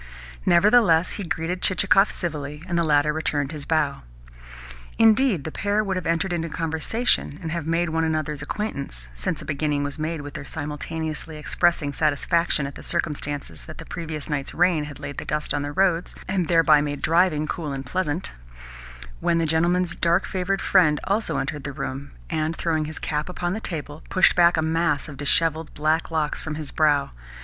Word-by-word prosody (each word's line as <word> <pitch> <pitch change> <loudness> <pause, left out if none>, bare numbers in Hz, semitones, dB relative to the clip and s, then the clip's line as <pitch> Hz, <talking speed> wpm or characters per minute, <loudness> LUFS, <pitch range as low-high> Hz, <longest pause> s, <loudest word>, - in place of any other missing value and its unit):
Nevertheless 180 -2 +5
he 205 - -4
greeted 170 +1 -2
Chichikov 195 +2 +4
civilly, 150 -3 -4
and 175 - -2
the 170 - +3
latter 150 -1 +3
returned 145 -2 -1
his 150 -3 -6
bow. 150 -4 0 1.0
Indeed, 225 - +4
the 160 - -5
pair 205 +4 0
would 195 -2 -2
have 185 - -3
entered 170 +2 0
into 165 -1 -2
conversation, 160 +2 0
and 165 -2 -5
have 170 -2 -3
made 170 +1 +1
one 160 0 +1
another's 155 -2 -1
acquaintance 140 - -4
(since - - -3
a - - -10
beginning 145 0 -1
was 145 +2 -4
made 155 0 -2
with 145 -1 -8
their - - -6
simultaneously 155 +2 -5
expressing 150 -1 +1
satisfaction 155 +1 +1
at 140 - -5
the - - -10
circumstance 145 -4 -2
that 155 - -10
the 165 - -9
previous 160 -3 -5
night's 145 -3 -3
rain 170 -3 +3
had 145 -1 -9
laid 140 - -6
the - - -5
dust 150 0 -1
on 145 - 0
the 145 0 -3
roads, 180 +1 +1
and 185 -3 0
thereby 165 -3 +5
made 145 -1 -3
driving 165 -2 +3
cool 155 -2 -4
and 135 -1 -5
pleasant) 175 +3 -1 0.9
when 170 - +2
the 165 - +1
gentleman's 170 +3 +2
darker 170 +3 +2
favoured 190 +1 -1
friend 155 -6 +4
also 210 +3 0
entered 135 +1 -3
the 140 - -4
room, 135 0 -5 0.2
and, 155 - -1
throwing 160 -2 0
his 155 +1 -7
cap 150 +2 -2
upon 175 0 -2
the 215 - -3
table, 150 -4 -5
pushed 185 - +4
back 175 -1 +5
a 160 - +2
mass 160 -2 +1
of 150 - -8
dishevelled 160 +2 +2
black 155 +2 +1
locks 155 -2 -1
from 160 -1 -4
his 155 -2 -6
brow. 145 -3 +2
160 Hz, 185 wpm, -24 LUFS, 150-175 Hz, 1.0 s, Nevertheless